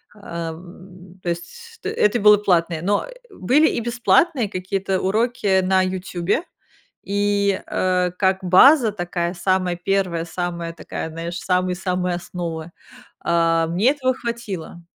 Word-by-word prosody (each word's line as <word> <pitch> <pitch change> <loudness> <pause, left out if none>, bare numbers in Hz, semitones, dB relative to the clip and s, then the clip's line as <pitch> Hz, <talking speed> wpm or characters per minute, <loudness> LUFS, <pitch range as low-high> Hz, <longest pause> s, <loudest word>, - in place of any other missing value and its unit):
а, 170 -5 -6
м. 180 +2 -14
То 175 - -2
есть 455 - -7
т - - -3
это 210 +3 +2
было 210 0 +7
платное. 170 -5 +1
Но, 200 +4 0
э, - - -12 0.2
были 300 - +3
и - - -1
бесплатные 240 - +2
какие-то 190 +1 -2
уроки 205 -2 +1
на 190 0 +2
"Ютьюбе", 185 - -2 0.6
и, 200 0 0
э, 180 -1 0
как 190 -1 +1
база 230 - +6
такая 175 -2 -3
самая 185 0 0
первая, 180 -2 -1
самая 170 0 -4
такая, 160 0 -6
знаешь, 170 +3 -5
самые-самые 180 0 -1
основы, 170 -2 -6 0.5
а, 165 -1 +2
мне 190 +10 +2
этого 260 -3 0
хватило. 210 -9 -6
185 Hz, 130 wpm, -21 LUFS, 175-205 Hz, 0.6 s, было